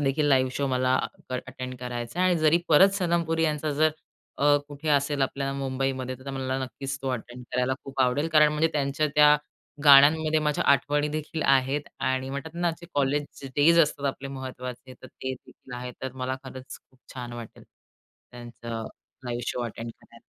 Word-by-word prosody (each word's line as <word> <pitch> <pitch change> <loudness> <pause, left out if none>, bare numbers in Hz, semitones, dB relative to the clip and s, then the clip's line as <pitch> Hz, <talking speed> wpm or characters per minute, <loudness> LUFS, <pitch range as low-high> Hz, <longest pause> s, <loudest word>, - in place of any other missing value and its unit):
देखील 145 +2 +1
live 130 -2 +3
show 140 - 0
मला 130 0 +1 0.4
अ - - -2
attend 130 0 -7
करायचा 120 +5 -5
आहे 185 - +4
आणि 175 - +2
जरी 155 +2 +4
परत 165 +5 +7
सनम 170 -2 +1
पुरी 165 0 0
यांचा 150 -1 -1
जर 155 +2 +3 0.5
अ, 145 0 +5
कुठे 145 +2 -6
असेल 140 0 +2
आपल्या 135 +1 -1
मुंबईमध्ये, 130 -1 -2
तर 135 +1 -7
मला 130 0 -2
नक्कीच 135 +1 -5
तो 135 - -2
अटेंड 125 0 -6
करायला 125 +1 +1
खूप 135 -1 -5
आवडेल. 130 +5 +2
कारण 150 -1 +7
म्हणजे 155 +2 +2
त्यांच्या 145 +1 0
त्या 150 0 +7 0.5
गाण्यांमध्ये 155 +3 +7
माझ्या 150 -1 0
आठवणीदेखील 150 +2 -1
आहेत. 135 +1 +2 0.2
आणि 130 0 -1
म्हणतात 140 +4 -6
ना, 175 0 +1
जे 170 - -11
कॉलेज 145 0 -1
डेज 165 +4 +5
असतात 145 -2 -2
आपले 135 0 -5
महत्त्वाचे, 130 -1 -7
तर - - -9
ते 130 +1 -6
देखील 125 0 -14
आहे. 125 0 -6
तर 130 -1 -4
मला 130 +1 -1
खरंच 130 0 -9
खूप 130 - -28 0.2
छान 125 -2 -6
वाटेल 120 -2 -9
त्यांचा 120 -1 -11 0.4
लाईव्ह 120 0 -3
शो 125 - -3
अटेंड 115 0 -6
करायला. 115 0 -19
135 Hz, 175 wpm, -26 LUFS, 130-150 Hz, 0.5 s, परत